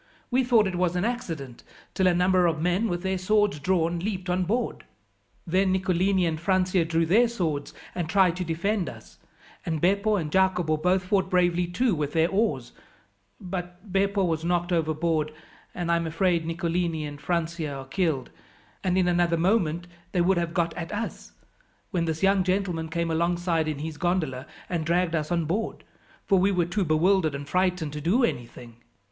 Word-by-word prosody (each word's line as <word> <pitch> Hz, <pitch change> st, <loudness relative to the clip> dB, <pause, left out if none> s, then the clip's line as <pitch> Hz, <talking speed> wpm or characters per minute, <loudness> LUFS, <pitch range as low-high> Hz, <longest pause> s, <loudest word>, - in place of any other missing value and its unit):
We 255 Hz, +2 st, +3 dB
thought 235 Hz, -4 st, +4 dB
it 190 Hz, -, -2 dB
was 180 Hz, -1 st, +1 dB
an 180 Hz, +3 st, 0 dB
accident 165 Hz, -, -4 dB, 0.3 s
till 190 Hz, -, +2 dB
a 180 Hz, -, +4 dB
number 180 Hz, 0 st, +3 dB
of 160 Hz, -2 st, 0 dB
men, 180 Hz, +7 st, +1 dB
with 175 Hz, 0 st, -3 dB
their 190 Hz, -1 st, -1 dB
swords 205 Hz, -2 st, +2 dB
drawn, 170 Hz, 0 st, +1 dB
leaped 185 Hz, -1 st, -3 dB
on 180 Hz, 0 st, +1 dB
board. 230 Hz, +7 st, -2 dB, 0.6 s
Then 185 Hz, +3 st, +2 dB
Nicolini 185 Hz, 0 st, +2 dB
and 160 Hz, -2 st, -1 dB
Francia 185 Hz, 0 st, +2 dB
drew 165 Hz, 0 st, +1 dB
their 220 Hz, +9 st, +4 dB
swords 165 Hz, -11 st, -2 dB, 0.2 s
and 175 Hz, -3 st, -3 dB
tried 180 Hz, -1 st, +4 dB
to 185 Hz, -, -2 dB
defend 180 Hz, +4 st, -1 dB
us, -, -, -13 dB, 0.4 s
and 160 Hz, -4 st, -2 dB
Beppo 200 Hz, +5 st, +2 dB
and 160 Hz, -6 st, -2 dB
Jacopo 180 Hz, -4 st, +2 dB
both 180 Hz, +4 st, +1 dB
fought 190 Hz, 0 st, +1 dB
bravely 175 Hz, -1 st, +2 dB
too 210 Hz, +6 st, +1 dB
with 150 Hz, -3 st, -2 dB
their 165 Hz, +1 st, +3 dB
oars; 195 Hz, -, 0 dB, 0.7 s
but 180 Hz, +1 st, -7 dB
Beppo 200 Hz, 0 st, +2 dB
was 165 Hz, -3 st, 0 dB
knocked 175 Hz, +1 st, 0 dB
overboard, 160 Hz, -1 st, 0 dB, 0.4 s
and 175 Hz, -1 st, -1 dB
I 170 Hz, -, +4 dB
am 170 Hz, -1 st, -2 dB
afraid 165 Hz, 0 st, +1 dB
Nicolini 165 Hz, -1 st, -1 dB
and 145 Hz, 0 st, -8 dB
Francia 170 Hz, -3 st, -2 dB
are 135 Hz, -1 st, -6 dB
killed, 140 Hz, -1 st, -1 dB, 0.5 s
and 185 Hz, -1 st, +1 dB
in 185 Hz, -1 st, +3 dB
another 175 Hz, -1 st, +2 dB
moment 175 Hz, -2 st, +1 dB, 0.3 s
they 180 Hz, -, +2 dB
would 180 Hz, +1 st, +3 dB
have 170 Hz, -1 st, -3 dB
got 170 Hz, -1 st, +1 dB
at 165 Hz, 0 st, -6 dB
us, 210 Hz, +2 st, -5 dB, 0.6 s
when 175 Hz, -4 st, 0 dB
this 160 Hz, +2 st, -3 dB
young 195 Hz, -1 st, +4 dB
gentleman 180 Hz, -4 st, -1 dB
came 170 Hz, 0 st, -1 dB
alongside 170 Hz, 0 st, 0 dB
in 155 Hz, -2 st, -2 dB
his 155 Hz, +1 st, -5 dB
gondola, 160 Hz, -8 st, -1 dB, 0.2 s
and 170 Hz, -3 st, -2 dB
dragged 170 Hz, +1 st, +1 dB
us 155 Hz, 0 st, -1 dB
on 170 Hz, -2 st, +1 dB
board, 205 Hz, +8 st, -2 dB, 0.4 s
for 195 Hz, -2 st, +3 dB
we 195 Hz, +2 st, +3 dB
were 180 Hz, -3 st, +1 dB
too 195 Hz, +4 st, -1 dB
bewildered 160 Hz, 0 st, +2 dB
and 140 Hz, 0 st, -6 dB
frightened 180 Hz, -3 st, 0 dB
to 150 Hz, -, -5 dB
do 200 Hz, -, +2 dB
anything. 120 Hz, -, -4 dB
175 Hz, 185 wpm, -26 LUFS, 160-190 Hz, 0.7 s, thought